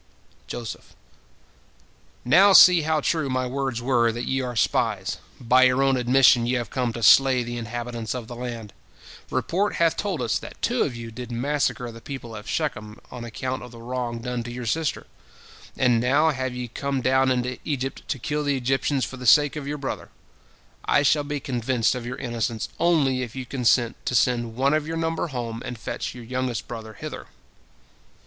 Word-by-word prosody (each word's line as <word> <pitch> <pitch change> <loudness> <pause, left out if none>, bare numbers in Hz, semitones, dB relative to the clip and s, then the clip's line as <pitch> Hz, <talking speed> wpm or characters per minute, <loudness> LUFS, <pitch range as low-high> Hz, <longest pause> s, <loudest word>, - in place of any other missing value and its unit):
Joseph: 120 -3 -7 1.3
"Now 190 +10 +6
see 180 -2 +9
how 155 0 0
true 155 -2 0
my 130 0 0
words 130 -2 -3
were, 120 -3 +3
that 120 +2 -5
ye 135 0 0
are 125 -1 -4
spies. 105 - 0 0.2
By 125 +2 +5
your 130 +1 +3
own 135 -1 +3
admission 125 -1 +4
ye 125 - +1
have 120 -4 -2
come 125 -3 -1
to 115 - -6
slay 130 +2 +6
the 120 0 -5
inhabitants 120 0 -4
of 120 -3 -6
the 120 - -8
land. 120 -3 -6 0.6
Report 200 +4 0
hath 165 -1 +2
told 185 -10 -2
us 115 - 0
that - - -11
two - - 0
of 125 - 0
you 115 -1 -7
did 125 +1 -8
massacre 125 -1 -1
the 115 0 -12
people 120 -5 -7
of 105 0 -9
Shechem 110 -9 -3
on 125 -2 -7
account 130 +3 -4
of 125 - -9
the 120 - -13
wrong 120 -1 -4
done 125 -1 -3
to 120 +1 -7
your 125 0 -6
sister, 155 +7 -1 0.7
and 120 -3 +3
now 145 +6 +3
have 130 -2 -3
ye 125 0 -4
come 135 +3 -3
down 130 +1 +3
into 125 0 -1
Egypt 135 -2 -3
to 140 - -2
kill 150 +4 -2
the 145 -1 0
Egyptians 135 +2 0
for 130 - -8
the 125 -1 -5
sake 145 +3 +6
of 145 -2 -5
your 150 +1 -3
brother. 140 -2 -5 0.7
I 145 - +3
shall 145 +1 +3
be 145 0 -3
convinced 125 -2 0
of 125 -2 -5
your 125 +1 -5
innocence 115 -3 -3
only 145 -7 +2
if 125 -1 -6
you 130 -1 -5
consent 120 -2 +1
to 125 - 0
send 120 -2 +1
one 135 +3 +2
of 155 0 0
your 165 0 -3
number 165 +1 -1
home 120 -5 -5
and 120 - -6
fetch 115 - -5
your 120 - -9
youngest 125 -2 -3
brother 110 -2 -7
hither." - - -8
125 Hz, 195 wpm, -24 LUFS, 120-135 Hz, 1.3 s, see